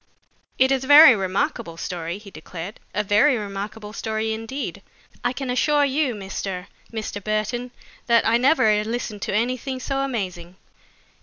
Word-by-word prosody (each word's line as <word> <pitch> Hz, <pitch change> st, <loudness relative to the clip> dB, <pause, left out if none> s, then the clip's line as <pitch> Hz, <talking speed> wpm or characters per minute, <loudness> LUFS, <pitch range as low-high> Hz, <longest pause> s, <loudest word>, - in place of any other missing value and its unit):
"It 260 Hz, +1 st, +4 dB
is 265 Hz, -1 st, +1 dB
a -, -, -6 dB
very 290 Hz, -2 st, +10 dB
remarkable 185 Hz, -3 st, -2 dB
story," 170 Hz, 0 st, -4 dB
he 205 Hz, -1 st, -13 dB
declared, 170 Hz, +4 st, -8 dB
"a 210 Hz, -, -1 dB
very 215 Hz, +7 st, +4 dB
remarkable 210 Hz, +1 st, -6 dB
story 220 Hz, 0 st, -2 dB
indeed. 225 Hz, +6 st, -5 dB, 0.4 s
I 245 Hz, -, +1 dB
can 260 Hz, 0 st, -4 dB
assure 290 Hz, +3 st, +3 dB
you, 275 Hz, -3 st, 0 dB
Mr. 190 Hz, -2 st, -5 dB, 0.3 s
Mr. 215 Hz, -3 st, -5 dB
Burton, 215 Hz, +4 st, -2 dB, 0.4 s
that 235 Hz, -1 st, +4 dB
I 230 Hz, +1 st, +4 dB
never 230 Hz, -6 st, +3 dB
listened 220 Hz, -2 st, -4 dB
to 195 Hz, -, -2 dB
anything 255 Hz, +3 st, -1 dB
so 270 Hz, +1 st, -2 dB
amazing. 185 Hz, -10 st, -4 dB
220 Hz, 150 wpm, -23 LUFS, 200-255 Hz, 0.4 s, very